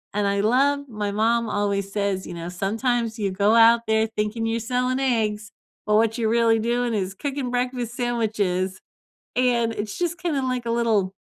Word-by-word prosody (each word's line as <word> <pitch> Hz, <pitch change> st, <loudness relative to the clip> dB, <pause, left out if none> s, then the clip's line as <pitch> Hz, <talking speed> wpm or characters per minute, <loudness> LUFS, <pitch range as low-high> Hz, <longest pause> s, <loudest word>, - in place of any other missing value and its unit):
and 210 Hz, -, +1 dB
I 200 Hz, 0 st, 0 dB
love 280 Hz, +5 st, +2 dB
My 210 Hz, -2 st, -3 dB
mom 230 Hz, +3 st, +1 dB
always 200 Hz, -1 st, -1 dB
says, 200 Hz, -2 st, -1 dB
you -, -, -7 dB
know, 170 Hz, 0 st, -6 dB
"Sometimes 225 Hz, +5 st, -1 dB
you 200 Hz, -2 st, 0 dB
go 200 Hz, +3 st, +2 dB
out 230 Hz, 0 st, +6 dB
there 220 Hz, 0 st, +2 dB
thinking 215 Hz, +1 st, -2 dB
you're 230 Hz, +1 st, -1 dB
selling 250 Hz, +3 st, -1 dB
eggs, 215 Hz, -5 st, 0 dB, 0.3 s
but 210 Hz, -, +1 dB
what 225 Hz, +1 st, +2 dB
you're 225 Hz, -2 st, 0 dB
really 230 Hz, -1 st, +3 dB
doing 240 Hz, +1 st, 0 dB
is 195 Hz, -1 st, -2 dB
cooking 270 Hz, +1 st, -4 dB
breakfast 245 Hz, -1 st, -2 dB
sandwiches," 210 Hz, -7 st, -1 dB, 0.6 s
and 240 Hz, -2 st, +2 dB
it's 210 Hz, -1 st, -5 dB
just 350 Hz, 0 st, -1 dB
kinda 325 Hz, -6 st, -1 dB
like 250 Hz, -2 st, -2 dB
a -, -, -1 dB
little, 220 Hz, -5 st, +1 dB
225 Hz, 180 wpm, -23 LUFS, 205-245 Hz, 0.6 s, out